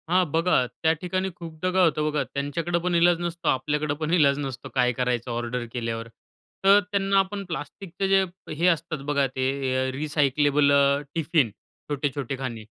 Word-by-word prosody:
हां 185 Hz, +1 st, +4 dB
बघा, 165 Hz, -5 st, +2 dB
त्या 160 Hz, +5 st, 0 dB
ठिकाणी 185 Hz, +1 st, -1 dB
खूपदा 170 Hz, +1 st, -4 dB
काय 185 Hz, 0 st, +3 dB
होतं 155 Hz, -2 st, +1 dB
बघा, 150 Hz, -1 st, 0 dB
त्यांच्याकडे 165 Hz, +5 st, -2 dB
पण 180 Hz, -1 st, 0 dB
इलाज 170 Hz, 0 st, +4 dB
नसतो, 170 Hz, 0 st, -4 dB
आपल्याकडे 150 Hz, +3 st, 0 dB
पण 160 Hz, +1 st, -1 dB
इलाज 140 Hz, -5 st, +4 dB
नसतो 135 Hz, -3 st, -5 dB
काय 125 Hz, -1 st, +3 dB
करायचं 125 Hz, 0 st, -1 dB
ऑर्डर 120 Hz, +1 st, -3 dB
केल्यावर. 115 Hz, -1 st, -3 dB, 0.6 s
तर 200 Hz, +1 st, +7 dB
त्यांना 195 Hz, -1 st, +2 dB
आपण 200 Hz, +1 st, -1 dB
प्लास्टिकचे 175 Hz, +4 st, -5 dB
जे, 195 Hz, 0 st, +5 dB, 0.3 s
हे 165 Hz, +4 st, +1 dB
असतात 165 Hz, -2 st, +1 dB
बघा 140 Hz, -1 st, +1 dB
ते, 130 Hz, 0 st, -2 dB, 0.4 s
अ, -, -, -3 dB
रिसायक्लेबल 145 Hz, 0 st, +2 dB
अ, 140 Hz, 0 st, +4 dB, 0.2 s
टिफिन, 160 Hz, -5 st, +2 dB, 0.4 s
छोटे-छोटे 140 Hz, -2 st, -2 dB
खाणी. 120 Hz, -4 st, -5 dB
150 Hz, 165 wpm, -25 LUFS, 135-175 Hz, 0.6 s, तर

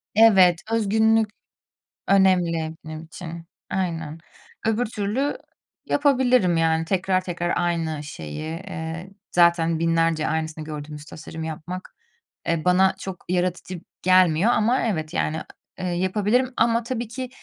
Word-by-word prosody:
Evet, 190 Hz, -6 st, +6 dB
özgünlük 220 Hz, 0 st, +3 dB, 0.8 s
önemli 175 Hz, -5 st, +3 dB
benim 155 Hz, 0 st, -7 dB
için, 165 Hz, 0 st, -9 dB, 0.2 s
aynen. 165 Hz, -4 st, -2 dB, 0.5 s
Öbür 225 Hz, +2 st, +1 dB
türlü 215 Hz, +7 st, -2 dB, 0.5 s
yapabilirim, 255 Hz, -, +3 dB
yani, 165 Hz, 0 st, +2 dB
tekrar 185 Hz, 0 st, +1 dB
tekrar 175 Hz, -1 st, -2 dB
aynı 165 Hz, -3 st, -1 dB
şeyi. 80 Hz, -, -7 dB
Eee, 165 Hz, +1 st, -6 dB, 0.2 s
zaten 170 Hz, -2 st, +3 dB
binlerce 165 Hz, -1 st, +1 dB
aynısını 160 Hz, 0 st, -2 dB
gördüğümüz 150 Hz, -1 st, -7 dB
tasarımı 160 Hz, 0 st, -8 dB
yapmak, 165 Hz, +4 st, -7 dB, 0.5 s
eee, 165 Hz, -1 st, 0 dB
bana 190 Hz, +1 st, +4 dB
çok 190 Hz, -2 st, -7 dB
yaratıcı 180 Hz, -1 st, -1 dB, 0.2 s
gelmiyor 185 Hz, +2 st, +4 dB
ama 240 Hz, +3 st, +2 dB
evet, 155 Hz, -5 st, -2 dB
yani, 155 Hz, -2 st, 0 dB, 0.4 s
eee, 185 Hz, -, -3 dB
yapabilirim 210 Hz, +8 st, +1 dB
ama 230 Hz, +1 st, +3 dB
tabii 235 Hz, 0 st, -3 dB
ki, 255 Hz, +2 st, -6 dB
180 Hz, 115 wpm, -24 LUFS, 160-210 Hz, 0.8 s, Evet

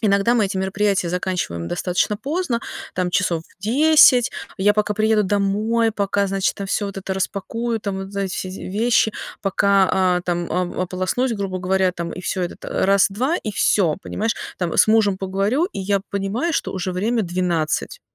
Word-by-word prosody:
иногда 200 Hz, +2 st, +3 dB
мы 215 Hz, -4 st, +3 dB
эти 190 Hz, -, -4 dB
мероприятия 195 Hz, -1 st, 0 dB
заканчиваем 180 Hz, -, -2 dB
достаточно 180 Hz, +3 st, 0 dB
поздно, 280 Hz, -, -2 dB, 0.3 s
там, 180 Hz, -1 st, -1 dB
часов 175 Hz, -3 st, 0 dB
в 185 Hz, -, -27 dB
10. 255 Hz, 0 st, +5 dB, 0.3 s
Я 205 Hz, +1 st, +3 dB
пока 210 Hz, 0 st, 0 dB
приеду 215 Hz, 0 st, +2 dB
домой, 210 Hz, +4 st, +1 dB
пока, 200 Hz, -1 st, 0 dB
значит, 195 Hz, 0 st, 0 dB
там 200 Hz, -, -5 dB
всё 205 Hz, -, 0 dB
вот 200 Hz, -1 st, -7 dB
это 190 Hz, 0 st, -4 dB
распакую, 225 Hz, +4 st, -2 dB
там 200 Hz, -2 st, -3 dB
вот 195 Hz, +1 st, -7 dB
за 200 Hz, -, -3 dB
эти 190 Hz, -1 st, -3 dB
все 185 Hz, -, -4 dB
вещи, 215 Hz, +4 st, +1 dB, 0.3 s
пока, 195 Hz, 0 st, +3 dB
а, 180 Hz, -1 st, +2 dB
там 175 Hz, -1 st, -2 dB
о 180 Hz, 0 st, -1 dB
ополоснусь, 185 Hz, +8 st, -1 dB
грубо 195 Hz, -3 st, -3 dB
говоря, 185 Hz, 0 st, +1 dB
там, 170 Hz, -1 st, -5 dB
и -, -, -7 dB
всё, 185 Hz, 0 st, -2 dB
это 175 Hz, -, -4 dB
т -, -, -9 dB
раз-два, 200 Hz, -, +2 dB
и 215 Hz, -, -4 dB
всё, 180 Hz, -6 st, +2 dB
понимаешь. 225 Hz, +2 st, -2 dB, 0.2 s
Там 175 Hz, -3 st, -2 dB
с -, -, +6 dB
мужем 215 Hz, -3 st, +3 dB
поговорю, 195 Hz, -, 0 dB
и 365 Hz, -, -7 dB
я 200 Hz, +1 st, 0 dB
понимаю, 200 Hz, -, -1 dB
что -, -, -1 dB
уже 185 Hz, -1 st, -3 dB
время 220 Hz, +6 st, 0 dB
12. 175 Hz, -3 st, -1 dB
195 Hz, 180 wpm, -21 LUFS, 185-215 Hz, 0.3 s, с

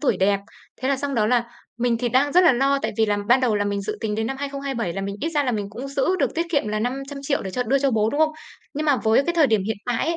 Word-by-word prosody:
tuổi 290 Hz, -, +1 dB
đẹp. 200 Hz, +1 st, +2 dB, 0.4 s
Thế 260 Hz, -, 0 dB
là 275 Hz, -, +2 dB
xong 280 Hz, 0 st, -3 dB
đó 215 Hz, -2 st, +2 dB
là 240 Hz, 0 st, +2 dB, 0.3 s
mình 235 Hz, -1 st, +1 dB
thì 245 Hz, 0 st, 0 dB
đang 275 Hz, +4 st, +2 dB
rất 360 Hz, +1 st, +6 dB
là 320 Hz, -, +7 dB
lo 275 Hz, +3 st, +2 dB
tại -, -, -1 dB
vì 220 Hz, -, +4 dB
là 205 Hz, -1 st, +1 dB
ban 255 Hz, +2 st, +5 dB
đầu 235 Hz, -5 st, +2 dB
là 205 Hz, -, 0 dB
mình 200 Hz, 0 st, -2 dB
dự 215 Hz, +2 st, -4 dB
tính 210 Hz, -2 st, -2 dB
đến 220 Hz, +1 st, -1 dB
năm 270 Hz, -, -3 dB
2027 275 Hz, -8 st, -3 dB
là 195 Hz, -, -4 dB
mình 200 Hz, +1 st, -4 dB
ít 320 Hz, -, -1 dB
ra 295 Hz, -3 st, +1 dB
là 250 Hz, -, 0 dB
mình 205 Hz, -2 st, -3 dB
cũng 245 Hz, +6 st, -7 dB
giữ 275 Hz, +7 st, 0 dB
được 275 Hz, -6 st, 0 dB
tiết 335 Hz, +1 st, -1 dB
kiệm 285 Hz, -9 st, +1 dB
là 215 Hz, 0 st, -1 dB
500.000.000 275 Hz, +3 st, -3 dB
để 190 Hz, -, -5 dB
cho 250 Hz, +6 st, -1 dB
đưa 270 Hz, +4 st, +1 dB
cho 275 Hz, -1 st, +1 dB
bố, 220 Hz, -1 st, +1 dB
đúng 290 Hz, -, -1 dB
không? 310 Hz, 0 st, +3 dB, 0.4 s
Nhưng 305 Hz, +2 st, -2 dB
mà 290 Hz, -3 st, +4 dB
với 225 Hz, +4 st, +2 dB
cái 345 Hz, -, -1 dB
thời 325 Hz, -4 st, +5 dB
điểm 220 Hz, -5 st, +2 dB
hiện 220 Hz, +1 st, -2 dB
tại 245 Hz, -2 st, 0 dB
ấy, 335 Hz, +1 st, 0 dB
250 Hz, 320 wpm, -23 LUFS, 215-280 Hz, 0.4 s, là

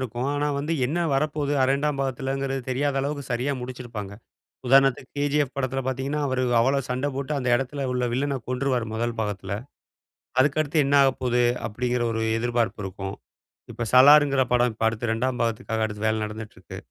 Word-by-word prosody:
இருக்கும். 125 Hz, 0 st, -3 dB
ஆனா 145 Hz, 0 st, 0 dB
வந்து 150 Hz, +4 st, -2 dB
என்ன 160 Hz, +6 st, -2 dB, 0.2 s
வரப்போது 145 Hz, 0 st, 0 dB
இரண்டாம் 140 Hz, +2 st, +1 dB
பாகத்தில்ங்குற 135 Hz, +1 st, -2 dB, 0.2 s
தெரியாத 140 Hz, +2 st, 0 dB
அளவுக்கு 140 Hz, 0 st, -3 dB
சரியா 125 Hz, +4 st, 0 dB
முடிச்சுருப்பாங்க. 120 Hz, -5 st, -7 dB, 0.6 s
உதாரணத்துக்கு, 135 Hz, 0 st, +4 dB
கேஜிஎஃப் 145 Hz, -1 st, 0 dB
படத்தில 135 Hz, 0 st, -1 dB
பார்த்தீங்கன்னா 135 Hz, +3 st, -2 dB
அவரு 130 Hz, -1 st, 0 dB, 0.2 s
அவ்வளோ 135 Hz, +4 st, +3 dB
சண்டை 130 Hz, +3 st, -1 dB
போட்டு 140 Hz, +2 st, -3 dB
அந்த 125 Hz, -2 st, -3 dB
இடத்துல 135 Hz, +2 st, -3 dB
உள்ள 125 Hz, 0 st, -1 dB
வில்லன 140 Hz, +1 st, -1 dB
கொன்றுருவார் 130 Hz, -2 st, 0 dB
முதல் 115 Hz, +1 st, -2 dB
பாகத்தில. 100 Hz, -3 st, -3 dB, 0.9 s
அதுக்கடுத்து 150 Hz, +3 st, +2 dB
என்ன 140 Hz, -, +2 dB
ஆகப்போகுது 125 Hz, -2 st, +1 dB, 0.2 s
அப்டீங்குற 120 Hz, +2 st, -1 dB
ஒரு 110 Hz, -, -2 dB, 0.2 s
எதிர்பார்ப்பு 120 Hz, -2 st, -1 dB
இருக்கும். 95 Hz, 0 st, -5 dB, 0.6 s
இப்ப 120 Hz, -, -4 dB
சலார்ங்கிற 140 Hz, 0 st, +7 dB
படம் 125 Hz, 0 st, +3 dB
இப்ப 110 Hz, +1 st, -2 dB
அடுத்து 115 Hz, +1 st, -1 dB
ரெண்டாம் 125 Hz, +2 st, -1 dB
பாகத்துக்காக 115 Hz, -1 st, -1 dB
அடுத்து 105 Hz, 0 st, -4 dB
வேல 110 Hz, 0 st, +1 dB
நடந்துட்டு 105 Hz, 0 st, -8 dB
இருக்கு -, -, -10 dB
130 Hz, 155 wpm, -25 LUFS, 120-140 Hz, 0.9 s, சலார்ங்கிற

